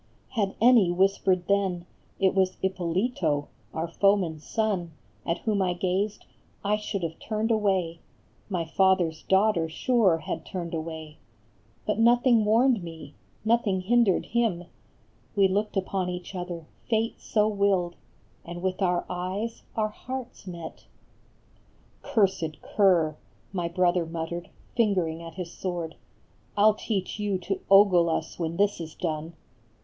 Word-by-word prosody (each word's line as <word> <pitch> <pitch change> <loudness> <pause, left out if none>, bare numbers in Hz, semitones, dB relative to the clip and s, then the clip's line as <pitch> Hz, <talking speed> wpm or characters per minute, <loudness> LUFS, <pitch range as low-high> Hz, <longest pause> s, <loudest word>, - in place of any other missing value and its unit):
Had 205 -5 -1
any 230 -5 +6
whispered 185 0 +2
then 190 -3 +1 0.3
It 190 -1 +3
was 190 -1 +1
Ippolito, 180 - 0 0.2
our 160 +1 -3
foeman 185 -2 +2
s 150 - -17
son, 200 -7 -1 0.3
At 170 - +1
whom 210 -3 0
I 180 -1 +1
gazed, 195 +4 -1 0.4
I 210 +1 +3
should 210 -3 -4
have 165 -1 -4
turned 220 +1 -1
away, 190 -6 +1 0.5
My 175 -4 -1
father 190 0 +3
s 160 0 -13
daughter 190 -4 +2
sure 200 0 +3
had 160 0 -5
turned 170 -1 -5
away. 160 -1 -5 0.7
But 210 0 0
nothing 240 0 +5
warned 230 +1 +4
me, 160 -4 -9 0.3
nothing 220 -4 +2
hindered 225 -1 +3
him; 225 -7 0 0.7
We 200 -2 +5
looked 205 +2 -1
upon 190 -1 -1
each 180 +1 -6
other, 175 -3 -5 0.2
Fate 225 0 0
so 210 -1 +2
willed, 200 -4 +1 0.5
And 175 +1 -8
with 185 +1 -1
our 180 -2 +1
eyes 190 +6 -3
our 215 -1 +1
hearts 250 -1 -7
met! 170 -3 -8 0.6
" - - -34
Cursed 190 -7 0
cur," 170 -7 +3 0.4
My 175 -3 -1
brother 175 -1 +1
muttered, 165 +1 -5 0.3
fingering 185 -8 +1
at 165 -1 -9
his 175 -2 -5
sword, 175 -3 -4 0.3
" - - -35
I 205 - +4
11 215 0 +5
teach 200 -2 -2
you 205 -2 0
to 190 +2 -3
ogle 195 -4 +6
us 165 - -3
when 165 0 -2
this 205 -1 +2
is 160 -1 -7
done 160 -1 -3
185 Hz, 145 wpm, -27 LUFS, 170-210 Hz, 0.7 s, any